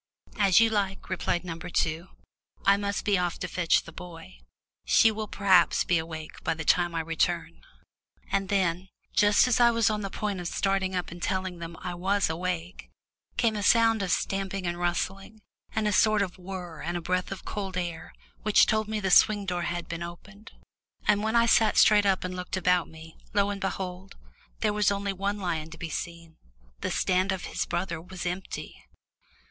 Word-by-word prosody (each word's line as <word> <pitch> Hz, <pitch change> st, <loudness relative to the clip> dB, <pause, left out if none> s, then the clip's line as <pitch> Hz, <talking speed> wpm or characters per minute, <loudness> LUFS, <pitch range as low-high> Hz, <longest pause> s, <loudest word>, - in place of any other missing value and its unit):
"As 195 Hz, -2 st, +5 dB
you 225 Hz, -1 st, +4 dB
like," 195 Hz, -2 st, -2 dB
replied 180 Hz, -1 st, -1 dB
number 170 Hz, +1 st, -6 dB
two. 165 Hz, +1 st, -1 dB, 0.6 s
"I 200 Hz, -, +6 dB
must 200 Hz, 0 st, -3 dB
be 200 Hz, -3 st, +3 dB
off 175 Hz, -2 st, -1 dB
to 180 Hz, -, -4 dB
fetch 175 Hz, -1 st, +2 dB
the 165 Hz, -, -11 dB
boy. 165 Hz, -, -11 dB, 0.4 s
She 225 Hz, -, +5 dB
will 215 Hz, 0 st, -4 dB
perhaps 190 Hz, -4 st, +3 dB
be 175 Hz, -2 st, +2 dB
awake 160 Hz, -1 st, -8 dB
by -, -, 0 dB
the 160 Hz, -1 st, -6 dB
time 175 Hz, 0 st, +2 dB
I 165 Hz, -, 0 dB
return." 160 Hz, 0 st, -1 dB, 0.7 s
And 195 Hz, -1 st, 0 dB
then 185 Hz, -2 st, 0 dB, 0.2 s
just 205 Hz, +3 st, +5 dB
as 250 Hz, -, +2 dB
I 240 Hz, -1 st, +7 dB
was 230 Hz, -2 st, +2 dB
on 210 Hz, 0 st, -2 dB
the 195 Hz, -, -4 dB
point 205 Hz, -1 st, -3 dB
of 175 Hz, -, -4 dB
starting 195 Hz, 0 st, 0 dB
up 180 Hz, -2 st, -3 dB
and 175 Hz, 0 st, -9 dB
telling 185 Hz, -2 st, -2 dB
them 170 Hz, 0 st, -7 dB
I 180 Hz, -1 st, -3 dB
was 190 Hz, +1 st, 0 dB
awake 180 Hz, +1 st, -4 dB, 0.5 s
came 225 Hz, -3 st, +2 dB
a 210 Hz, -, -2 dB
sound 225 Hz, +1 st, +4 dB
of 195 Hz, -, -2 dB
stamping 195 Hz, +2 st, -1 dB
and 175 Hz, 0 st, -2 dB
rustling, 195 Hz, +4 st, -3 dB, 0.3 s
and 220 Hz, -1 st, +1 dB
a -, -, +2 dB
sort 215 Hz, +1 st, +4 dB
of 185 Hz, -1 st, -6 dB
whirr 180 Hz, -3 st, -7 dB
and 175 Hz, 0 st, -2 dB
a -, -, -2 dB
breath 185 Hz, +2 st, -1 dB
of 195 Hz, -, -7 dB
cold 195 Hz, -3 st, -4 dB
air, 175 Hz, -2 st, -4 dB, 0.3 s
which 215 Hz, -1 st, +5 dB
told 215 Hz, -1 st, 0 dB
me 215 Hz, 0 st, -2 dB
the 190 Hz, -2 st, -1 dB
swing 205 Hz, +2 st, +5 dB
door 180 Hz, -2 st, -2 dB
had 175 Hz, 0 st, -4 dB
been 170 Hz, 0 st, -5 dB
opened. 200 Hz, +5 st, -10 dB, 0.6 s
And 205 Hz, -1 st, +4 dB
when 220 Hz, +1 st, 0 dB
I 235 Hz, 0 st, +5 dB
sat 225 Hz, -1 st, +4 dB
straight 205 Hz, -1 st, +6 dB
up 190 Hz, -1 st, +2 dB
and 185 Hz, 0 st, -4 dB
looked 180 Hz, +1 st, -4 dB
about 180 Hz, -1 st, +2 dB
me, 160 Hz, 0 st, -13 dB, 0.2 s
lo 200 Hz, 0 st, +3 dB
and 200 Hz, 0 st, -6 dB
behold, 190 Hz, 0 st, -4 dB, 0.5 s
there 210 Hz, -, +2 dB
was 210 Hz, -1 st, +2 dB
only 200 Hz, 0 st, -1 dB
one 200 Hz, +2 st, -2 dB
lion 165 Hz, -5 st, -3 dB
to 165 Hz, -, -11 dB
be 165 Hz, 0 st, -6 dB
seen 170 Hz, -1 st, -6 dB, 0.4 s
the -, -, -2 dB
stand 185 Hz, +1 st, +1 dB
of 190 Hz, -2 st, -3 dB
his -, -, -3 dB
brother 175 Hz, -2 st, -3 dB
was 180 Hz, +1 st, -8 dB
empty! 180 Hz, +2 st, -6 dB
185 Hz, 195 wpm, -27 LUFS, 175-205 Hz, 0.7 s, I